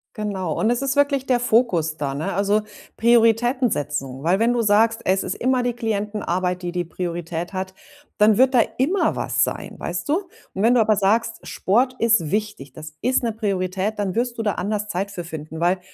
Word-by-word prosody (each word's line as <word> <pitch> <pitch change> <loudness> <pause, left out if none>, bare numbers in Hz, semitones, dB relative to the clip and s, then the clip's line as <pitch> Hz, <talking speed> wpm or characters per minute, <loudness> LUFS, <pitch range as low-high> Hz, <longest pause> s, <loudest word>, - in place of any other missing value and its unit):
Genau, 195 -6 -3
und 220 - +2
es 245 +3 0
ist 275 +1 0
wirklich 280 -2 +2
der 250 -2 +2
Fokus 215 -10 +1
da, 140 -2 -2
ne, 145 +3 -3
also 205 +2 +2 0.4
Prioritäten 235 +2 +3
setzen, 135 -2 -3
weil 175 +5 +2
wenn 230 +2 +2
du 240 - +1
sagst, 220 +2 +3
es 190 +1 +2
ist - - -3
immer 255 0 0
die 245 -1 0
Klientenarbeit, 205 -5 -2
die 175 -1 -4
die 175 -1 -2
Priorität 170 0 -4
hat, 190 -1 -4 0.5
dann 210 0 +5
wird 260 +1 +4
da 245 - +6 0.2
immer 340 +10 +1
was - - +1
sein, - - -3
weißt - - -4
du? 350 +5 -1 0.2
Wenn 225 +6 +3
du 235 - +5
aber 215 -1 +3
sagst, 225 +3 +1
„Sport 250 +6 +1
ist 225 -9 +2
wichtig, 205 -10 -3
das 155 0 -10
ist 255 0 +1
'ne 230 - 0
Priorität,“ 195 -1 -2
dann 200 -3 -2
wirst 235 +2 -1
du 225 - -2
da 210 - +1
anders 210 +2 -2
Zeit 195 +1 -3
für 180 -3 -6
finden, 160 -1 -8
weil, 180 +2 +2
210 Hz, 200 wpm, -22 LUFS, 180-235 Hz, 0.5 s, da